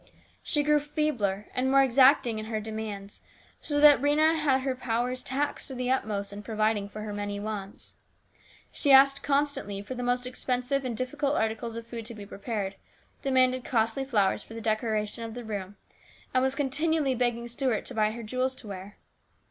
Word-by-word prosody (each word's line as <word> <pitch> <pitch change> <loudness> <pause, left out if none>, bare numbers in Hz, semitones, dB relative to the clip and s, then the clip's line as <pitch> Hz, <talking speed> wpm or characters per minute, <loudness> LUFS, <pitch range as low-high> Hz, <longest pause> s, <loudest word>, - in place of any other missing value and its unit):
She 295 -1 +1
grew 300 0 +4
feebler 290 -10 -1
and 255 +1 0
more 275 0 +6
exacting 255 -3 +4
in 215 - -5
her 220 -1 -2
demands, 215 -2 -6 0.4
so 290 -1 -1
that 290 -3 +8
Rhena 305 +3 +4
had 285 -4 +2
her 265 0 -1
powers 250 0 -1
taxed 285 +3 -2
to 265 - -6
the 250 0 -1
utmost 200 -5 -1
in 205 - -7
providing 215 -1 0
for 215 +1 -8
her 210 -1 -5
many 205 0 -3
wants. 205 -2 -6 0.8
She 285 - +1
asked 275 +1 +7
constantly 280 -8 0
for 230 - -6
the 250 - -5
most 245 0 0
expensive 255 +2 -1
and 235 -3 -3
difficult 280 +3 -1
articles 225 +1 -1
of 230 0 -6
food 230 -1 -7
to 235 - -8
be 205 -1 -9
prepared, 200 -1 -4 0.4
demanded 255 -2 +2
costly 225 +2 0
flowers 210 -7 +1
for 225 - -12
the - - -5
decoration 215 0 -1
of 225 0 -6
the 245 - -6
room, 205 -3 -5 0.6
and 255 - +3
was 265 +1 +1
continually 290 +1 +1
begging 240 -1 -1
Stuart 240 -1 -1
to - - -7
buy 215 -2 +2
her 235 0 -7
jewels 255 +4 -1
to 225 - -11
wear. 195 +1 -8
240 Hz, 185 wpm, -28 LUFS, 215-270 Hz, 0.8 s, that